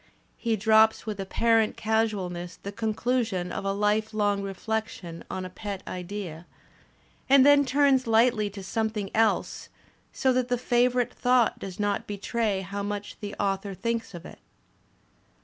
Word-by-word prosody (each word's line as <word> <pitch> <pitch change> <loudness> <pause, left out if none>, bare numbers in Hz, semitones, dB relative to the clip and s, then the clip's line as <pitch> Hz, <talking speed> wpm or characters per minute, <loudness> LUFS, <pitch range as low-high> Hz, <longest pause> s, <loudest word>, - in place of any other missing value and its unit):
He 230 -2 0
drops 220 +1 +4
with 210 -2 -4
apparent 225 +3 +2
casualness 200 -6 -1
the 200 - -5
conclusion 220 -3 -1
of - - -4
a 195 - +1
life 210 +2 0
long 205 -1 +1
reflection 195 -3 -4
on 185 - -4
a - - -6
pet 200 0 -6
idea, 180 -2 -6 0.8
a^d 275 -1 +7
then 285 0 +6
turns 270 -1 +3
lightly 225 -2 +3
to 200 -1 -9
something 215 0 -2
else, 225 0 +1 0.4
so 260 -1 +1
that 250 -1 +1
the 245 0 0
favourite 245 0 +1
thought 250 -1 +2
does 190 0 -8
not 205 -1 -1
betray 205 0 -1
how 200 +2 -5
much 205 0 -5
the 205 -1 -6
author 195 0 -1
thinks 230 -2 -3
of 170 +1 -9
it. - - -11
215 Hz, 150 wpm, -27 LUFS, 195-230 Hz, 0.8 s, a^d